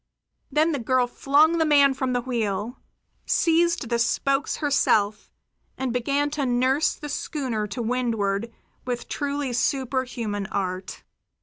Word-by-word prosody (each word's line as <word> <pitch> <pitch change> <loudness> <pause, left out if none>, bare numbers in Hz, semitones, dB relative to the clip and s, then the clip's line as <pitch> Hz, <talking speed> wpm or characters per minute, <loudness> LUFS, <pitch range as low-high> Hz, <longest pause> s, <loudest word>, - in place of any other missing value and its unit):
Then 310 +2 +3
the 285 - -1
girl 250 +1 +2
flung 295 +6 +3
the - - +4
man 285 -3 +5
from 260 -1 -2
the 245 - 0
wheel, 230 -2 -2 0.5
seized 335 -4 +2
the 235 -1 +1
spokes 275 +4 +1
herself, 215 -8 +1 0.5
and 260 -2 -2
began 280 +4 0
to 295 -2 -1
nurse 260 +5 +2
the 295 - -8
schooner 260 -7 -3
to 220 +4 -4
windward 225 -3 -1 0.3
with 245 -1 -4
truly 285 -2 -2
superhuman 245 -5 -1
art. 185 -2 -4
255 Hz, 130 wpm, -24 LUFS, 230-285 Hz, 0.5 s, man